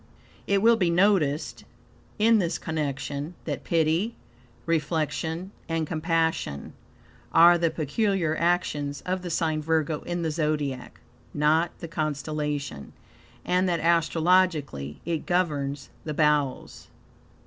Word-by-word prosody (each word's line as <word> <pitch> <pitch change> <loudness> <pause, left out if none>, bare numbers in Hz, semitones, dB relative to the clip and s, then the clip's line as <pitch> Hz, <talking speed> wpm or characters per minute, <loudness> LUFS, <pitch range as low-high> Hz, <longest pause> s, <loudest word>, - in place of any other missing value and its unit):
It 200 0 +2
will 230 0 +6
be 180 -5 +2
noticed 170 -5 +2 0.5
in 225 +1 +4
this 170 -3 0
connection 145 0 -4
that 145 -4 -4
pity, 165 +7 +1 0.5
reflection, 160 +2 -1 0.2
and 165 -1 0
compassion, 160 - -1 0.6
are 170 +1 +7
the 170 -1 +2
peculiar 165 - 0
actions 155 -5 0
of 185 0 -2
the 180 - -5
sign 160 -2 0
Virgo 155 -1 0
in 175 -1 -3
the 160 - 0
Zodiac 150 -4 -2 0.4
(not 155 +3 +2
the 165 - -5
constellation), 150 - -3 0.5
and 180 +1 +2
that 170 -1 0
astrologically 165 - +1
it 165 -2 -3
governs 145 -7 -1
the 155 -2 -4
bowels. 150 -3 0
160 Hz, 115 wpm, -26 LUFS, 150-175 Hz, 0.6 s, are